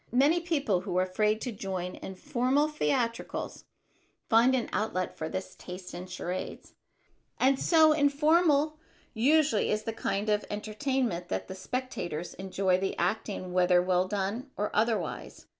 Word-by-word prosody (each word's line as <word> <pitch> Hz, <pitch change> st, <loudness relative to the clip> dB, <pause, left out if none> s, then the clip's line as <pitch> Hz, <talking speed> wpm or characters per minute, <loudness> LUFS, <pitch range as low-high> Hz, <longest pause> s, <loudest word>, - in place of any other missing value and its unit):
Many 285 Hz, +8 st, +4 dB
people 285 Hz, -, 0 dB
who 185 Hz, -2 st, -3 dB
are 185 Hz, -, +4 dB
afraid 210 Hz, +3 st, 0 dB
to 250 Hz, -, -3 dB
join 190 Hz, -3 st, -4 dB
in 190 Hz, -, -8 dB
formal 270 Hz, +5 st, +1 dB
theatricals 250 Hz, -6 st, -2 dB, 0.6 s
find 235 Hz, +4 st, +5 dB
an 245 Hz, -, -1 dB
outlet 185 Hz, -4 st, -1 dB
for 160 Hz, -, -4 dB
this 185 Hz, 0 st, -5 dB
taste 180 Hz, 0 st, -9 dB
in 175 Hz, +1 st, -6 dB
charades; 180 Hz, 0 st, -5 dB, 0.7 s
and 265 Hz, +1 st, +3 dB
so 315 Hz, -2 st, +5 dB
informal 305 Hz, +1 st, +3 dB, 0.3 s
usually 275 Hz, 0 st, +3 dB
is 215 Hz, 0 st, 0 dB
this 225 Hz, -, -3 dB
kind 200 Hz, +2 st, -1 dB
of 210 Hz, 0 st, +2 dB
entertainment 215 Hz, -3 st, -2 dB
that -, -, -3 dB
the 190 Hz, -, -6 dB
spectators 185 Hz, -6 st, -4 dB
enjoy 190 Hz, -1 st, 0 dB
the 195 Hz, 0 st, -2 dB
acting 195 Hz, -4 st, -2 dB
whether 180 Hz, 0 st, +4 dB
well 180 Hz, 0 st, +2 dB
done 205 Hz, +7 st, -2 dB
or 210 Hz, +1 st, -1 dB
otherwise. 220 Hz, +1 st, -1 dB
215 Hz, 145 wpm, -29 LUFS, 185-270 Hz, 0.7 s, find